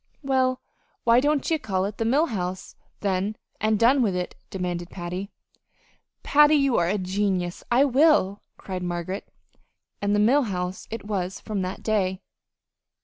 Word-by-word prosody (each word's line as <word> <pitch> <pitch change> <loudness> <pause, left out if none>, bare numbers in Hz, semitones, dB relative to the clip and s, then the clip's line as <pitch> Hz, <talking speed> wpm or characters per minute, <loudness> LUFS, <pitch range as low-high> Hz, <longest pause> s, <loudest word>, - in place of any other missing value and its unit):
"Well, 260 -1 +1 0.4
why 235 +1 +5
don't 290 +1 +1
ye 320 - +2
call 190 -6 -1
it 205 +1 -6
the 225 - 0
'Mill 280 +8 +3
House,' 185 - -4 0.3
then, 195 +1 0 0.2
an' 215 0 +2
done 255 +5 +4
with 205 -6 +1
it?" 180 0 -3 0.2
demanded 175 -2 -4
Patty. 180 +2 -5 0.9
"Patty, 295 +1 +5
you're 270 - +3
a 200 +4 +1
genius! 185 -2 -1
I 250 +4 +5
will," 265 - +3 0.2
cried 185 -2 -5
Margaret. 175 +2 -4 0.7
And 205 0 +1
the - - +2
"Mill 250 +8 +4
House" 180 -2 -4
it 220 -2 -6
was 190 -3 -3
from 210 -3 -3
that 185 +1 -5
day. 195 -3 0
205 Hz, 150 wpm, -25 LUFS, 185-245 Hz, 0.9 s, why